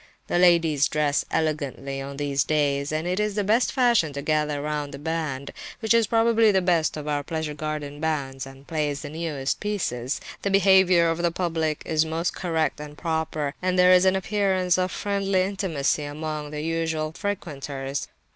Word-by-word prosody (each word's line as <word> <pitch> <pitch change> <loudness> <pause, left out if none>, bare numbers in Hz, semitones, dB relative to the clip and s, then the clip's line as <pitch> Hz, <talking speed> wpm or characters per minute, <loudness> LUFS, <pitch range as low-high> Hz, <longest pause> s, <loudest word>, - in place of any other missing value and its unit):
The 175 - 0
ladies 165 -5 +4
dress 150 -1 +1
elegantly, 140 -3 -2
on 140 0 -7
these 140 -1 0
days, 145 -2 0
and 155 +1 -2
it 180 +2 0
is 210 -1 0
the 205 - +1
fashion 235 - +3
to 140 0 -5
gather 150 -1 0
round 150 -1 -3
the - - -8
band, 150 -3 -3 0.3
which 220 0 +2
is 230 -2 +4
probably 225 -1 +4
the 190 - +3
best 170 -4 +1
of 150 0 -6
our 145 -1 0
pleasure 160 0 -4
garden 150 -1 -5
bands, 140 -4 -2
and 135 +1 -14
plays 150 -2 -2
the 145 - -6
newest 155 -4 -2
pieces. 150 - -2 0.2
The 200 - -1
behaviour 190 -3 +5
of 165 0 0
the 170 - +2
public 165 -3 -2
is 155 -1 +2
most 160 +2 -2
correct 160 -4 -1
and 150 0 -9
proper, 160 -3 -2
and 185 0 0
there 180 0 +6
is 180 +1 +5
an 190 0 +4
appearance 190 -2 +1
of 185 0 0
friendly 195 -2 0
intimacy 175 -7 -1
among 150 0 -5
the 150 0 -5
usual 160 -1 -1
frequenters. 140 -7 -4
160 Hz, 175 wpm, -25 LUFS, 145-185 Hz, 0.3 s, there